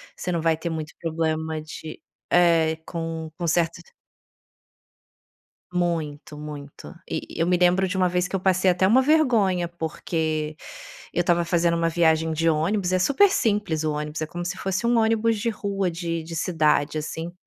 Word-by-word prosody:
Você 180 - -5
não 170 -2 -1
vai 165 -1 +2
ter 170 +1 -4
muito 160 -2 -5
problema 160 -1 -2
de 155 0 -9 0.3
é 165 -2 +4
com 165 -1 -5
com 175 - -2
certos 165 +1 +1 1.9
Muito, 160 -3 -2
muito. 150 +1 -9 0.2
E - - -2 0.2
e - - -5
eu 165 - +2
me 180 - +3
lembro 180 +2 +3
de 185 - -3
uma 185 -1 +2
vez 180 0 0
que 195 - -4
eu - - 0
passei 190 0 +3
até 180 +1 +3
uma 245 +7 +5
vergonha, 230 - +2
porque 160 -2 -3 0.6
eu 175 - +1
estava 175 0 +2
fazendo 170 0 +2
uma 165 0 +1
viagem 160 -1 +2
de 165 +1 +1
ônibus, 180 +4 +1
e - - +3
é 185 - +3
super 280 - +5
simples 205 - 0
o 155 - 0
ônibus, 150 +1 -4
é 155 - -2
como 175 +2 -6
se 175 - -3
fosse 195 +4 -2
um 240 0 +3
ônibus 225 0 +2
de 230 +2 0
rua, 200 -4 -2
de 170 -1 -3
de 165 +1 -7
cidade 155 -3 +1
assim 160 +3 -5
170 Hz, 180 wpm, -24 LUFS, 160-185 Hz, 1.9 s, uma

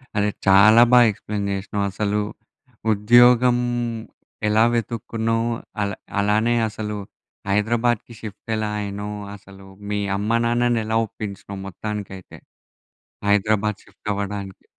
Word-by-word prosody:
అ‌దే 105 0 +2 0.2
చాలా 110 +4 +7
బాగా 125 -1 +8
ఎక్స్ప్లేన్ 105 0 -5
చేసినావు. 100 +1 -2
అసలు 105 +1 -1 0.7
ఉద్యోగం 120 +3 +5 0.9
ఎలా 105 +1 +4
వెతుక్కున్నావు, 115 0 -1 0.3
అల్ 100 -1 -2 0.3
అలానే 110 +4 +2
అసలు 105 0 -5 0.5
హైదరాబాద్‌కి 115 +3 0
షిఫ్ట్ 110 0 -10
ఎలా 110 -1 -2
అయినావు, 105 +1 -5 0.2
అసలు 95 -1 -15 0.3
మీ 105 - 0 0.2
అమ్మ 110 +3 +1
నాన్నని 120 -1 +1
ఎలా 110 0 0
ఒప్పించినావు? 100 -2 -7
మొత్తానికైతే. 95 -1 -7 0.9
హైదరాబాద్ 105 0 +2
షిఫ్ట్ 105 - -8
అవ్వడానికి. 100 -1 -5
105 Hz, 105 wpm, -22 LUFS, 100-115 Hz, 0.9 s, బాగా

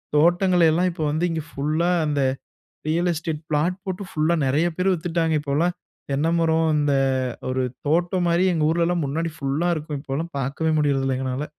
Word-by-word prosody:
தோட்டங்களையெல்லாம், 175 +1 +4
இப்போ 160 -2 -4
வந்து 155 +4 0
இங்க 160 -2 -3
ஃபுல்லா 155 +5 0 0.2
அந்த 145 -2 0 0.7
ரியல் 170 +3 +1
எஸ்டேட் 160 -1 -4
பிளாட் 165 +5 +1
போட்டு 190 0 -4
ஃபுல்லா 155 +2 +1
நெறைய 145 +6 +2
பேர் 185 +1 +2
வித்துட்டாங்க. 165 -2 -1
இப்போலாம் 155 +5 0 0.4
தென்ன 145 +4 +1
மரம், 160 -1 +2
அந்த 145 -1 +2 0.6
ஒரு 130 0 0 0.3
தோட்டம் 175 +3 +1
மாரி 170 +2 +3
எங்க 155 -2 +1
ஊர்லலாம் 170 0 +1
முன்னாடி 165 +4 -2
ஃபுல்லா 140 +5 -1
இருக்கும். 150 -1 -5
இப்போலாம் 155 +4 -4
பாக்கவே 155 +5 -1
முடியறதில்ல 135 -3 +1
எங்கனால. 130 +2 -3
160 Hz, 155 wpm, -23 LUFS, 145-170 Hz, 0.7 s, தோட்டங்களையெல்லாம்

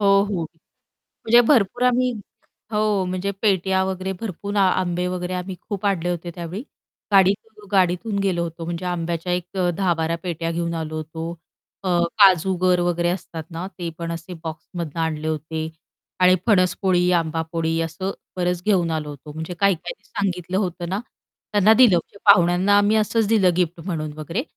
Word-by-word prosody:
हो, 205 - +2 0.2
हो. 195 -5 -2 0.6
म्हणजे 235 +2 +3
भरपूर 245 -2 +3
आम्ही 250 0 +3 0.6
हो, 210 -2 +1
म्हणजे 185 +2 -2
पेट्या 190 -2 +2
वगैरे 190 0 -3
भरपूर 205 -1 -5
आ 200 - +5 0.2
आंबे 180 0 -1
वगैरे 180 0 -3
आम्ही 180 0 -4
खूप 205 -1 -3
आणले 180 -3 0
होते 175 0 -4
त्यावेळी. 175 +6 -5 0.5
गाडीतून 200 +2 +2
गाडीतून 190 +2 +2
गेलो 185 -3 0
होतो. 165 0 -5
म्हणजे 170 +2 -4
आंब्याच्या 170 0 -2
एक 180 +2 -3 0.2
10-12 165 -3 0
पेट्या 165 -2 -3
घेऊन 170 0 -2
आलो 155 -1 -4
होतो. 160 +1 -5 0.6
अ, - - 0 0.3
काजूगर 185 -1 +5
वगैरे 175 0 +1
असतात 165 -3 -5
ना 170 +2 -5
ते 175 -2 -3
पण 170 0 -3
असे 165 +2 -7
बॉक्समधनं 160 0 -5
आणले 155 -1 -1
होते 160 +1 -3 0.5
आणि 180 0 +6
फणस 185 -5 +4
पोळी, 180 -1 +3
आंबा 165 -1 +1
पोळी 165 0 0
असं 165 +4 -3 0.3
बरच 180 -1 -1
घेऊन 180 -5 +3
आलो 150 -1 -4
होतो. 145 +1 -10
म्हणजे 160 +3 -5
काही-काहीनी 200 - 0
सांगितलं 185 -3 -2
होतं 175 -3 -2
ना, 195 +3 -1 0.5
त्यांना 205 +1 +5
दिलं 225 -7 +6
म्हणजे 200 - -5
पाहुण्यांना 180 +2 +5
आम्ही 205 +2 +3
असंच 220 0 +2
दिलं 210 -5 +4
गिफ्ट 175 -1 0
म्हणून 155 -4 -3
वगैरे 165 - -3
180 Hz, 160 wpm, -22 LUFS, 165-195 Hz, 0.6 s, आणि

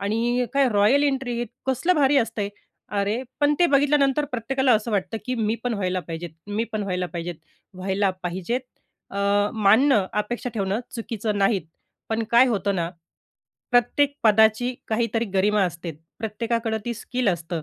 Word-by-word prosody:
आणि 235 +4 0
काय 275 -2 +4
royal 210 +7 +4
entry, 260 -4 -1 0.2
कसलं 265 +8 +2
भारी 290 -2 +3
असते. 210 -4 -1 0.5
अरे 205 +5 0 0.2
पण 290 0 +4
ते 350 - +5
बघितल्यानंतर 285 0 +3
प्रत्येकाला 260 +2 +1
असं 220 +2 -1
वाटतं, 205 +2 -1
की 255 - -1
मी 220 -1 0
पण 245 -2 0
व्हायला 185 -2 -1
पाहिजेत, 165 0 -5 0.2
मी 205 +2 -1
पण 215 -1 -1
व्हायला 180 -2 -1
पाहिजेत. 170 +1 -5 0.4
व्हायला 190 +1 0
पाहिजेत 185 +8 -2 0.5
अ, 200 - -5 0.3
मानणं, 220 0 +4
अपेक्षा 235 +4 -2
ठेवणं 200 +1 -1
चुकीचं 220 -2 -3
नाहीत. 195 -2 +2 0.5
पण 225 0 0
काय 240 +2 +6
होतं 200 -3 0
ना, 170 0 -1 0.8
प्रत्येक 260 +4 +3
पदाची 220 +3 +4
काहीतरी 225 0 0
गरिमा 205 +1 +3
असते 170 -1 -4 0.3
प्रत्येकाकडं 225 +1 -2
ती 240 - -2
स्किल 245 +1 -2
असतं 170 -2 -2
220 Hz, 150 wpm, -24 LUFS, 200-245 Hz, 0.8 s, काय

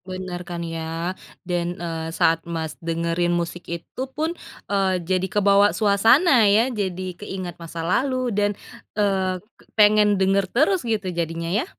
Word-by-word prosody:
Benar 185 -1 -6
kan 170 -1 -4
ya 165 +2 -3 0.3
dan 175 -1 -2
eee, 165 -1 -4
saat 165 0 +2
Mas, 160 -2 -3
dengerin 170 +1 0
musik 170 0 -4
itu 170 +9 -6
pun, 320 +2 0 0.4
eee, 190 -2 +2
jadi 185 +1 0
kebawa 200 0 +4
suasana 225 - +5
ya, 225 +5 +3
jadi 185 -3 -3
keingat 185 -4 -6
masa 165 0 -6
lalu 255 +5 0
dan 205 0 +2 0.5
eee, 190 -3 +1 0.4
pengen 210 -1 +5
denger 195 0 +2
terus 320 +8 +3
gitu 215 -3 0
jadinya 165 0 -3
ya. 245 - 0
185 Hz, 145 wpm, -23 LUFS, 170-205 Hz, 0.5 s, suasana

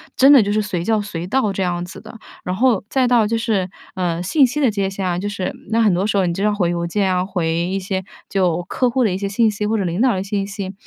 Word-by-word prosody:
真 270 +2 +6
的 280 -4 +8
就 205 -1 -1
是 215 - +1
随 185 -5 -3
叫 220 +3 +1
随 180 -4 -5
到， 215 -2 +1
这 195 - -3
样 175 -1 -1
子 180 - -11
的。 220 +1 -11 0.3
然 180 - -2
后 235 -1 +2
再 260 -2 +2
到 235 -3 +3
就 230 +2 0
是， 215 -5 -1 0.3
呃， 175 -2 -1
信 275 - +4
息 265 +5 -3
的 265 -6 +3
界 200 -2 -1
限 195 0 -4
啊， 175 -1 -1
就 205 +2 -3
是 200 -3 -3 0.2
那 230 +1 +3
很 210 -4 +4
多 180 +3 0
时 205 - 0
候 190 - +3
你 170 - 0
就 195 - -3
要 210 0 +2
回 175 -4 +1
邮 170 0 -2
件 190 +1 0
啊， 180 - +1
回 175 -4 -1
一 175 +4 -1
些 190 0 -3 0.2
就 180 -3 0
客 250 +4 +1
户 255 +1 +1
的 215 - +2
一 - - -2
些 200 0 -2
信 220 +2 +2
息 210 0 -3
或 220 +1 +1
者 200 - 0
领 175 +3 -2
导 255 -2 +4
的 185 - -2
信 200 0 -2
息， 195 -1 -6
200 Hz, 315 characters per minute, -20 LUFS, 180-220 Hz, 0.3 s, 的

